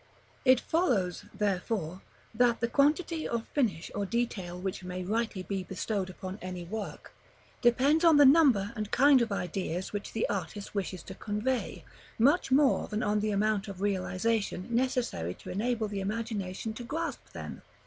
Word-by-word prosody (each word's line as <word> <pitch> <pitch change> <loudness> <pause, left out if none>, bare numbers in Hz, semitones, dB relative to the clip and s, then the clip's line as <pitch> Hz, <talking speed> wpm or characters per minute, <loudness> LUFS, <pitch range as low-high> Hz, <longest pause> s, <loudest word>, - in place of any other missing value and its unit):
§ - - -30 0.4
XXII. 260 - +8
It 255 - 0
follows, 235 - 0
therefore, 190 -3 -2 0.3
that 235 +1 +3
the 235 - +1
quantity 310 +5 +2
of 235 -1 -2
finish 215 - 0
or 205 - -1
detail 195 -5 -2
which 190 0 -4
may 180 0 -4
rightly 215 0 -1
be 195 0 -3
bestowed 190 +1 -3
upon 185 +2 -7
any 185 -1 -5
work, 205 +4 -6 0.5
depends 270 +7 +4
on 330 -3 +7
the 290 - +8
number 260 -8 +5
and 215 -2 -3
kind 275 +1 +6
of 230 -2 0
ideas 180 -1 -3
which 205 -1 -4
the 225 - 0
artist 200 +1 -4
wishes 190 -3 -3
to 190 - -8
convey, 215 +6 -2 0.3
much 280 +9 +4
more 275 0 +4
than 215 0 -2
on 210 0 +1
the 215 +1 0
amount 210 0 +1
of 195 -2 -7
realization 200 0 0
necessary 235 - 0
to - - -9
enable 225 +2 0
the 200 -1 -4
imagination 215 -1 -3
to 240 - -7
grasp 325 +7 -3
them. - - -7
210 Hz, 170 wpm, -30 LUFS, 190-245 Hz, 0.5 s, XXII